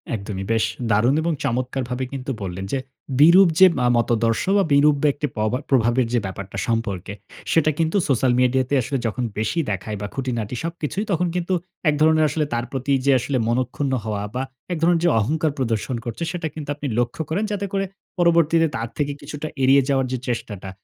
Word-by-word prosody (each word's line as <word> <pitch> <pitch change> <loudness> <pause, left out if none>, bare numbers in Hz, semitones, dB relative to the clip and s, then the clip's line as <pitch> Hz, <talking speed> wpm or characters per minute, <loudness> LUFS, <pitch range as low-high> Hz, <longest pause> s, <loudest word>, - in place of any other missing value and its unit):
একদমই। 100 -2 -5
বেশ 115 -1 +2 0.3
দারুণ 115 +7 +3
এবং 170 +1 0
চমৎকারভাবে 130 0 -2
কিন্তু 135 +1 -4
বললেন 95 0 -4
যে 135 - +1 0.4
বিরূপ 175 +6 +8
যে 190 - +10
মা 125 - +1
মতাদর্শ 115 -1 +1
বা 200 - +4
বিরূপ 145 +1 +5
বা 150 - +3
একটি 150 - -2
পভা 110 +4 0
প্রভাবের 120 -1 +3
যে 120 - +3
ব্যাপারটা, 95 +1 -6
সম্পর্কে, 105 -4 -2 0.4
সেটা 155 -1 +3
কিন্তু 165 +4 +1
social 130 -2 +2
media 125 +1 +3
তে - - -2
আসলে 135 +3 -2
যখন 120 +3 -3
বেশি 110 +10 -1
দেখায় 100 +2 -4
বা 105 - -3
খুঁটিনাটি 125 -4 -3
সবকিছুই 170 +4 -3
তখন 180 0 +1
কিন্তু 180 +1 -1 0.4
এক 150 - +2
ধরণের 155 0 +5
আসলে 150 +1 0
তার 120 0 -1
প্রতি 135 +1 -2
যে 140 - +5
আসলে 135 +2 -1
মনক্ষুন্ন 130 +3 -1
হওয়া 105 -2 -2
বা 130 - -1 0.3
এক 170 - -2
ধরণের 170 0 +3
যে - - +5
অহংকার 155 +8 0
প্রদর্শন 120 -1 -1
করছে 120 +7 -4
সেটা 170 -3 -3
কিন্তু 150 -2 -7
আপনি 145 0 -5
লক্ষ্য 120 +5 -1
করেন, 180 +7 0
যাতে 200 -1 -2
করে 195 0 0 0.3
পরবর্তীতে 165 -1 +4
তার 115 +1 -3
থেকে 145 -1 0
কিছুটা 150 +1 -6 0.2
এড়িয়ে 135 +1 +5
যাওয়ার 135 -2 +2 0.2
চেষ্টাটা, 105 -5 -4
130 Hz, 185 wpm, -22 LUFS, 115-155 Hz, 0.4 s, যে